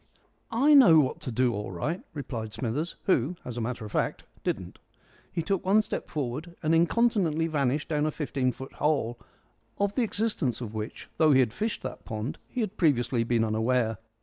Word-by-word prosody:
"I 270 +6 +4
know 225 - +8
what 135 -4 +1
to 125 - -5
do 120 +1 +2
all 105 -1 -4
right," 150 - -2
replied 115 -6 -5
Smithers, 140 +8 -2
who, 165 -2 +2
as 125 - -5
a 120 - -3
matter 120 -1 -3
of 105 - -8
fact, - - -1 0.2
didn't. - - -3 0.5
He 165 - -2
took 195 +1 0
one 205 +3 +4
step - - -5
forward, 150 +4 -4
and 155 +1 +2
incontinently 170 -2 +3
vanished 145 -3 0
down 150 -1 +1
a - - 0
fifteen 135 -4 -1
foot 130 +1 -9
hole, 140 -6 0 0.6
of 200 0 +1
the 255 - +1
existence 205 - 0
of 115 -3 -6
which, 110 0 -6
though 155 -2 +5
he 130 - +6
had 120 -4 +2
fished 220 - -2
that - - -6
pond, 110 +4 -4
he 250 - -3
had 215 -1 -3
previously 125 -7 +2
been 115 -1 +2
unaware. 110 0 +1
145 Hz, 190 wpm, -28 LUFS, 120-170 Hz, 0.6 s, know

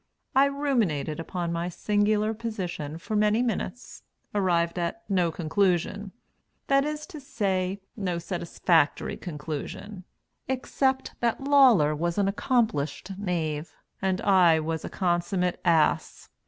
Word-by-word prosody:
I 270 +1 +7
ruminated 235 - 0
upon 170 0 -3
my 170 +1 -2
singular 210 +3 +1
position 185 -9 -4
for 215 +6 -4
many 210 +3 +3
minutes, 235 -1 -4 0.3
arrived 175 -4 +1
at 175 +6 -3
no 180 -4 +1
conclusion 185 +4 0 0.5
that 275 0 +3
is 300 0 -3
to 335 -5 -10
say, 195 -7 -1
no 185 -5 -2
satisfactory 170 -2 0
conclusion, 165 +5 -6 0.4
except 265 0 0
that 240 +3 0
Lawler 250 - +5
was 170 +3 -2
an 200 -1 +2
accomplished 195 - 0
knave 165 -5 -2 0.3
and 190 -1 0
I 180 -5 +5
was 160 0 -3
a - - -5
consummate 180 0 0
ass. 165 -3 +1
185 Hz, 120 wpm, -27 LUFS, 170-220 Hz, 0.5 s, I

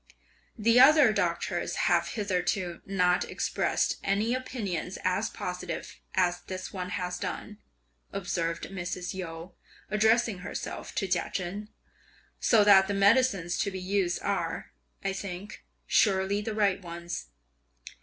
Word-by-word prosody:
"The 230 +2 +4
other 285 -4 +7
doctors 175 -3 -1
have 170 -1 +3
hitherto 185 -3 -1
not 180 -2 +2
expressed - - 0
any 205 +4 +1
opinions 210 -9 -3
as 190 +4 +1
positive 180 0 -5 0.2
as 175 -2 +2
this 185 0 -6
one 180 -2 -4
has 180 -1 -3
done," 210 0 -5 0.5
observed 170 -3 -2
Mrs. 180 -1 -4
Yu, 170 -1 -6 0.4
addressing 220 -1 +3
herself 180 - -6
to 195 - 0
Chia 180 -1 0
Chen, 200 +3 -4 0.7
"so 220 -3 +5
that 195 -2 +7
the 200 - -1
medicines 200 -4 +3
to 200 - +1
be 190 -1 -5
used 185 -1 0
are, - - -2 0.3
I 195 - 0
think, 195 +1 -7 0.2
surely 195 0 +2
the 215 0 -4
right 200 -2 +2
ones!" 170 - -6
190 Hz, 125 wpm, -29 LUFS, 180-210 Hz, 0.7 s, other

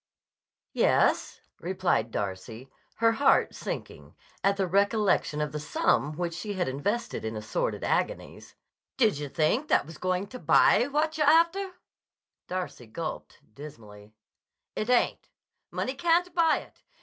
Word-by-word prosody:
"Yes," - - +2 0.2
replied - - 0
Darcy, 105 +6 -5 0.2
her 230 0 +3
heart 275 +5 +3
sinking, - - -7 0.3
at 200 0 +2
the 195 - +1
recollection 200 -4 +1
of 150 -1 -2
the 150 - -4
sum 150 0 0
which 175 -1 -2
she 205 +5 -5
had 185 -2 -1
invested 175 - -2
in 110 0 -4
assorted - - -3
agonies. - - -2 0.4
"Did 215 - +3
yah 145 -1 -5
think 170 - +1
that - - +3
was 165 +1 -11
going 185 +1 -1
to 255 - -8
buy - - +5
yah 245 - +1
what 310 +2 0
yah'r 300 -1 +5
after?" 355 +4 +3 0.7
Darcy 180 -10 -5
gulped 155 +8 -6
dismally. 105 -7 -12 0.6
"It 215 - -3
ain't. 250 -1 +1 0.4
Money 260 - -3
can't 340 +5 +1
buy 330 -2 +3
it. - - -19
190 Hz, 140 wpm, -27 LUFS, -, 0.7 s, buy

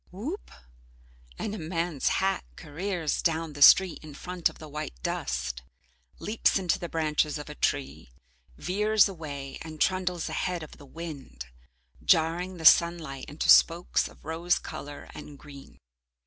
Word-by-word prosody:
Whoop! 260 - -6 0.9
And 205 - -4
a 215 - -5
man's 165 -2 -2
hat 195 0 +1
careers 170 +1 -3
down 165 -2 -1
the 145 - -9
street 185 +4 +7
in 150 -2 -11
front 180 +2 -1
of - - -15
the 155 - -10
white 150 - -6
dust, - - -2 0.6
leaps 215 0 +1
into 185 -3 0
the 175 - -5
branches 155 -1 0
of 150 0 -8
a - - -6
tree, 70 - -2 0.5
veers 210 +3 +3
away 145 -7 -7
and 155 -1 -9
trundles 180 -2 0
ahead 180 -3 -2
of 155 - -12
the 145 - -13
wind, 140 - -8 0.6
jarring 175 +3 +2
the 160 - -7
sunlight 160 -5 +4
into 145 +2 -4
spokes 170 +1 +5
of - - -17
rose 165 +3 0
colour 145 0 -8
and 145 - -10
green. 140 -1 -13
160 Hz, 150 wpm, -28 LUFS, 145-180 Hz, 0.9 s, street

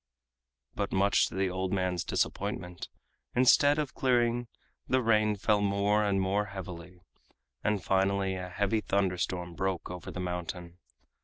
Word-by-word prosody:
But - - -2
much 100 +1 +3
to - - -9
the 95 -1 0
old 95 0 -2
man's 90 -2 0
disappointment, 90 -3 -3 0.5
instead 135 +4 +5
of 150 -3 -2
clearing 120 -2 +1 0.4
the 130 - +3
rain 110 -2 +3
fell 105 +1 +2
more 100 +1 +2
and 100 -2 +1
more 100 +2 +1
heavily, 90 -3 -9 0.6
and 105 -3 0
finally 95 0 +1
a 90 -1 -5
heavy 100 +3 0
thunderstorm 90 -3 -1
broke 95 -1 -2
over 90 -1 -7
the - - -6
mountain. 90 0 -5
95 Hz, 140 wpm, -30 LUFS, 90-105 Hz, 0.6 s, instead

